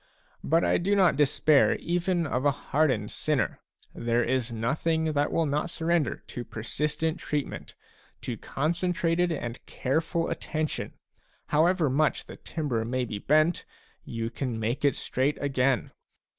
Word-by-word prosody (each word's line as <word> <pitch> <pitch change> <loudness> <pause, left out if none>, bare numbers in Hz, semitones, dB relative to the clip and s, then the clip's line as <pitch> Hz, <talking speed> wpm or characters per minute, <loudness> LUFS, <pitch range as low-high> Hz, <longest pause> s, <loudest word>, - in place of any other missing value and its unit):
But 165 +3 +3
I - - +3
do 200 +4 +1
not 190 -3 +4
despair 145 0 +4
even 175 0 0
of 130 -3 -1
a 145 - +5
hardened 135 -6 0
sinner. 150 -6 0 0.3
There 120 +1 +1
is 125 -1 0
nothing 155 +8 0
that 145 0 +1
will 165 - +2
not 150 +4 -1
surrender 165 -3 0
to 120 - -6
persistent 150 +9 -2
treatment, 150 -2 -4 0.5
to - - -3
concentrated 175 +2 0
and 120 -6 -4
careful 160 +5 -1
attention; 155 -1 -3 0.6
however 165 +2 +3
much 145 +4 +1
the - - -10
timber 140 -9 -2
may 125 +2 -1
be 105 -3 -5
bent, 155 +8 +3 0.4
you 115 0 -4
can 125 -2 -3
make 120 +7 -2
it 140 -2 +3
straight 135 +3 0
again. 135 -2 +1
150 Hz, 140 wpm, -27 LUFS, 125-165 Hz, 0.6 s, a